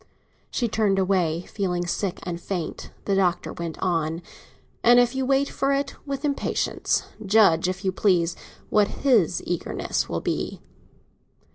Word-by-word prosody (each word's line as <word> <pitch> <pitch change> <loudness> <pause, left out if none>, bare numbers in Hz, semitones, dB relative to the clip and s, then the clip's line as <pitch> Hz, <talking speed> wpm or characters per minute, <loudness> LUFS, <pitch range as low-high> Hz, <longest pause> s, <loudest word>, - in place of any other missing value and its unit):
She 240 - 0
turned 210 -3 +1
away, 180 -4 +1
feeling 180 -4 -2
sick 180 +1 -2
and 175 -1 -4
faint; 175 -4 -4
and - - -20
the 200 - +1
Doctor 185 -3 +1
went 170 -2 -5
on. 165 -2 0 0.6
"And 240 +1 +7
if 245 -1 +3
you 265 -1 -1
wait 275 +1 +3
for 275 0 0
it 275 0 -1
with 275 +1 -3
impatience, 280 -1 0 0.2
judge, 195 -5 +4
if 190 +2 -5
you 190 - +2
please, 180 -3 +2 0.4
what 210 -1 +4
his 220 - +2
eagerness 175 -2 -2
will - - -2
be!" - - -2
195 Hz, 150 wpm, -25 LUFS, 175-235 Hz, 0.6 s, And